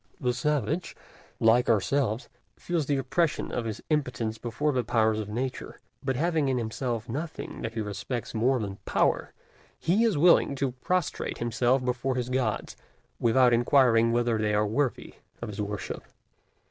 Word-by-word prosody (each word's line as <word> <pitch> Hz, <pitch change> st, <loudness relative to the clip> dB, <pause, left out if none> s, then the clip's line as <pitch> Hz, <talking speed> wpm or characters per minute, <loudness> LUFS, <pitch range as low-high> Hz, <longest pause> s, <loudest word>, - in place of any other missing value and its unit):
The 125 Hz, -3 st, 0 dB
savage, 150 Hz, +6 st, -1 dB, 0.4 s
like 115 Hz, +2 st, +4 dB
ourselves, 115 Hz, +2 st, +1 dB, 0.3 s
feels 170 Hz, -5 st, -2 dB
the 145 Hz, -, +1 dB
oppression 145 Hz, +5 st, 0 dB
of 120 Hz, -, -2 dB
his 110 Hz, -1 st, -5 dB
impotence 125 Hz, -7 st, -1 dB
before 135 Hz, +6 st, -1 dB
the 125 Hz, -3 st, 0 dB
powers 110 Hz, -2 st, +2 dB
of 105 Hz, -1 st, -4 dB
Nature; 125 Hz, +4 st, -4 dB, 0.2 s
but 135 Hz, -1 st, 0 dB
having 160 Hz, 0 st, +1 dB
in 130 Hz, -, +1 dB
himself 115 Hz, 0 st, -3 dB
nothing 155 Hz, +7 st, -5 dB
that 115 Hz, 0 st, -4 dB
he 115 Hz, -, -1 dB
respects 110 Hz, +4 st, -4 dB
more 125 Hz, +3 st, +2 dB
than 100 Hz, -3 st, -4 dB
Power, -, -, +1 dB, 0.5 s
he 190 Hz, +7 st, +2 dB
is 220 Hz, -8 st, +2 dB
willing 165 Hz, -3 st, +5 dB
to 135 Hz, -1 st, -1 dB
prostrate 170 Hz, +7 st, -2 dB
himself 120 Hz, +2 st, +1 dB
before 125 Hz, +1 st, -1 dB
his 125 Hz, -1 st, -2 dB
gods, 125 Hz, -4 st, -1 dB, 0.4 s
without 120 Hz, +1 st, +4 dB
inquiring 120 Hz, -2 st, +4 dB
whether 120 Hz, -1 st, +1 dB
they 105 Hz, -1 st, +1 dB
are 105 Hz, +1 st, +2 dB
worthy 125 Hz, +5 st, -1 dB, 0.3 s
of 120 Hz, -, -5 dB
his 105 Hz, 0 st, -4 dB
worship. 105 Hz, -1 st, -4 dB
125 Hz, 160 wpm, -27 LUFS, 115-140 Hz, 0.5 s, willing